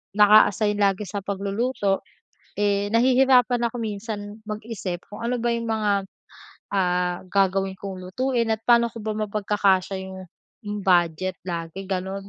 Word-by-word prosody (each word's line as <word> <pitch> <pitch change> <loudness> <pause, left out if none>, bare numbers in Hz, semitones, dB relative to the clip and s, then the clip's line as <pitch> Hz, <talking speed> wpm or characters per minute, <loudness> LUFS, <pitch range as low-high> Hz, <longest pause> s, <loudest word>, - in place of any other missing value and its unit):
naka-assign 210 0 +5
lagi 200 0 +2
sa 205 - -3
pagluluto, 200 +1 -1 0.5
eh, 205 0 +1
nahihirapan 250 0 +4
ako 245 - -9
minsan 210 0 -5
mag-isip 210 -4 -5
kung 205 - -9
ano 250 +1 0
ba 240 - 0
'yung 230 0 -2
mga, 205 -3 +1 0.7
ah, 180 -2 +1
gagawin 195 0 +1
kong 195 -2 -6
lutuin 235 +5 -1
at 220 - -2
pa'no 235 0 +5
ko 230 - -9
ba 215 - -1 0.2
mapagkakasya 200 -2 +1
'yung 190 0 -8 0.7
budget 180 0 +2
lagi 170 +1 -5
gano'n. 190 +1 -4
205 Hz, 130 wpm, -24 LUFS, 190-225 Hz, 0.7 s, naka-assign